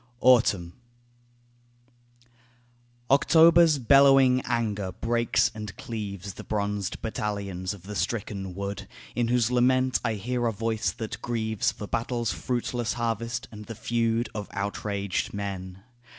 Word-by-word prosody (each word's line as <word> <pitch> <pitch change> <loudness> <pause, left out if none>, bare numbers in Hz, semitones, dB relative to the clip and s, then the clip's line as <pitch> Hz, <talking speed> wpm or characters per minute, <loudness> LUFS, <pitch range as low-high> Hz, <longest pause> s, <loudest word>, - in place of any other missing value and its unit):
AUTUMN 105 -9 +4 2.4
October's 165 +2 +6
bellowing 135 0 +5
anger 105 -5 -1
breaks 115 0 +1
and 105 -2 -7
cleaves 100 -4 -6
The - - -9
bronzed 100 -2 -2
battalions 100 -4 -3
of 95 - -16
the 105 +2 -7
stricken 100 -4 -3
wood 100 0 -5 0.3
In 120 -1 0
whose 120 -1 +2
lament 130 +1 +3
I 115 -3 0
hear 120 +4 -1
a - - +1
voice 110 -2 -1
that 110 0 -6
grieves 110 -3 -1
For 105 - -8
battle's 115 -1 -1
fruitless 120 +4 -2
harvest, 115 0 -2
and 105 -1 -9
the 115 - -7
feud 115 +1 0
Of 105 -2 -5
outraged 100 -1 -2
men. 95 -2 -5
110 Hz, 120 wpm, -27 LUFS, 100-120 Hz, 2.4 s, October's